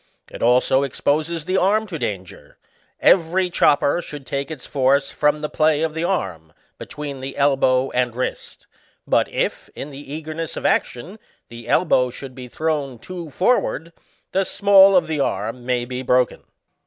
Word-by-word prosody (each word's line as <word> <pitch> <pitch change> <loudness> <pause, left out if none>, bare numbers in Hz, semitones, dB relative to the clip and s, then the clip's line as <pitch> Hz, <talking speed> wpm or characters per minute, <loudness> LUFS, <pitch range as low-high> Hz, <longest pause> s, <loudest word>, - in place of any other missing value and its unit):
21 - - -13
It - - -8
also 130 +2 +3
exposes 150 +4 -1
the 185 +2 0
arm 210 +4 +2
to 175 -7 -6
danger; 95 -7 -6 0.4
every 180 +1 +3
chop 145 -4 +3
per 155 +5 +1
should 145 -5 -9
take 140 +1 -3
its 155 -5 -8
force 140 +1 +1
from 150 0 +1
the 150 - -2
play 155 0 +1
of 160 -1 -1
the 160 +1 -3
arm, 90 - -3 0.3
between 145 -2 -7
the 135 +1 -7
elbow 135 -2 +2
and 125 -2 0
wrist; 130 - -5 0.4
but - - +2
if, - - -2
in 145 - -7
the 140 0 -10
eagerness 155 +1 -5
of - - -5
action, 175 - -1 0.3
the 115 0 -11
elbow 130 -8 +3
should 130 +1 -9
be 125 -1 -9
thrown 145 -2 -2
too 175 +5 -8
forward, 170 - 0 0.4
the 195 - +1
small 195 0 +5
of 180 - +4
the 155 -2 -3
arm 115 0 -2
may 125 -1 0
be 125 +1 -5
broken. 125 -1 +1
145 Hz, 170 wpm, -21 LUFS, 125-165 Hz, 0.4 s, small